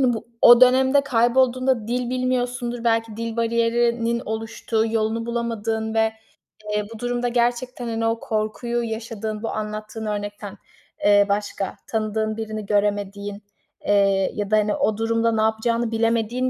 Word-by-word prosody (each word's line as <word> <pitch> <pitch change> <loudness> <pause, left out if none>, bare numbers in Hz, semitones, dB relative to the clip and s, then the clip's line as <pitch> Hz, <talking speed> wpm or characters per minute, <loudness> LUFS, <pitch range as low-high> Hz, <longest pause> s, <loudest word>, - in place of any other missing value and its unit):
hani, 255 -2 +3
bu 225 - -6 0.2
o 240 0 +9
dönemde 260 +2 +5
kaybolduğunda 255 -1 +2
dil 245 0 -1
bilmiyorsundur, 245 -1 -2
belki 225 -1 +1
dil 230 0 -4
bariyerinin 235 0 +1
oluştuğu, 225 0 -2
yolunu 225 +1 -1
bulamadığın 225 -2 -2
ve, 220 0 +2 0.6
eee, 210 0 0
bu 220 - -10
durumda 245 0 -1
gerçekten, 245 +1 -1
hani, 225 0 -2
o 225 0 0
korkuyu 230 +3 -2
yaşadığın, 220 -1 -5
bu - - -2
anlattığın 215 +1 -5
örnekten, 205 -1 -5 0.5
eee, 205 0 +6
başka, 200 -1 -2
tanıdığın 215 0 -1
birini 215 -1 -5
göremediğin, 205 0 -1 0.4
eee, 195 -1 +3
ya 205 0 -3
da, 215 - +5
hani, 210 0 +1
o 215 -1 0
durumda 230 +1 +1
ne 220 - +1
yapacağını 225 +1 0
bilemediğin 230 +2 0
225 Hz, 140 wpm, -23 LUFS, 215-240 Hz, 0.6 s, o